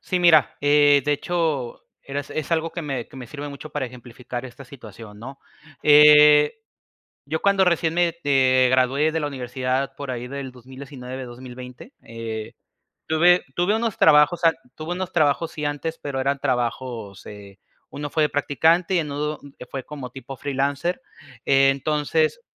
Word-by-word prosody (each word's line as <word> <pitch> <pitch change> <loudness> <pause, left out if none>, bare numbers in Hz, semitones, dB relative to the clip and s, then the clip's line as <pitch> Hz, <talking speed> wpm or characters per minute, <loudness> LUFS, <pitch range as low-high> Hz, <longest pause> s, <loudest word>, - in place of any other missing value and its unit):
sí, 185 - -2
mira, 160 -7 +4
eh, 145 0 +4
de 150 - +1
hecho, 150 -5 -2 0.2
eras 140 +1 -6
es 155 +1 -4
algo 165 0 0
que 170 - -5
me 135 -5 -4
que - - -15
me 130 -2 -8
sirve 145 +4 -7
mucho 145 +2 -9
para 140 -3 -3
ejemplificar 125 0 -9
esta 130 +2 -11
situación, 110 -5 -12
¿no?, 135 +5 -10 0.4
eh, 150 0 +7 0.7
yo 160 +3 -3
cuando 200 -1 +3
recién 170 -2 +1
me, 175 -1 +1
eh, 130 -2 +4
gradué 130 +4 +2
de 160 - -1
la 150 - -2
universidad, 130 0 -3
por 140 -2 -7
ahí 125 -1 -5
del 135 0 -6
2019, 130 +1 -9
2020, 125 - -11
eh, 115 -1 -7 0.5
tuve 175 +3 +4
tuve 175 +4 +1
unos 225 -2 -2
trabajos 150 +3 +4
ant 165 -1 +4 0.2
tuve 155 +2 -7
unos 185 0 -4
trabajos, 160 0 +1
sí 150 - -6
antes, 145 +3 -3
pero 140 -4 -5
eran 140 +1 0
trabajos, 120 -5 -3
eh, 100 -1 -12 0.3
uno 145 +1 -6
fue 155 - +1
de 150 - +2
practicante 165 +6 +1
y - - +3
en 150 -3 -4
uno 150 +2 -3 0.2
que - - -10
fue 130 +1 -7
como 140 -4 -8
tipo 135 +1 -9
freelancer, 140 - -2 0.4
entonces, 145 - +2
140 Hz, 165 wpm, -23 LUFS, 130-155 Hz, 0.7 s, eh